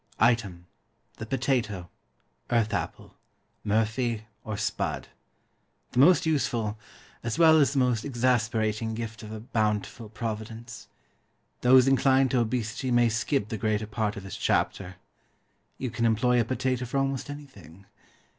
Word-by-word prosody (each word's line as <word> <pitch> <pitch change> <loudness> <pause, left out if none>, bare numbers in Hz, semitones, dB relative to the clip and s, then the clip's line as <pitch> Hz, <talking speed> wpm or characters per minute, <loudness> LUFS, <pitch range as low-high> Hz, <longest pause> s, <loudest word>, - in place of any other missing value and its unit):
Item, 105 -7 +1 0.5
the 110 - -7
POTATO, 115 -8 -1 0.6
earth 115 -2 +1
apple, 100 - -4 0.5
murphy, 110 +2 0 0.2
or 110 -2 -4
spud; 105 0 -2 0.8
the - - 0
most 170 +6 +6
useful, 120 -9 0 0.4
as 115 +3 -3
well 160 -2 +7
as 140 -1 +3
the - - -2
most 125 -3 +2
exasperating 115 -4 0
gift 110 0 -6
of 110 -1 -9
a 110 - -6
bountiful 110 0 -2
Providence. 115 +1 -6 0.7
Those 130 +1 +6
inclined 135 0 +4
to 130 - +2
obesity 120 +2 -2
may 120 -1 +4
skip 115 0 -1
the 110 - -4
greater 110 -1 0
part 105 -1 -2
of 100 - -7
this 95 - -7
chapter. 95 -1 0 0.8
You 130 -3 -4
can 115 0 +1
employ 120 +2 +3
a - - -1
potato 130 0 -1
for 125 +3 -3
almost 135 0 -1
anything. 105 - -11
115 Hz, 135 wpm, -27 LUFS, 110-130 Hz, 0.8 s, well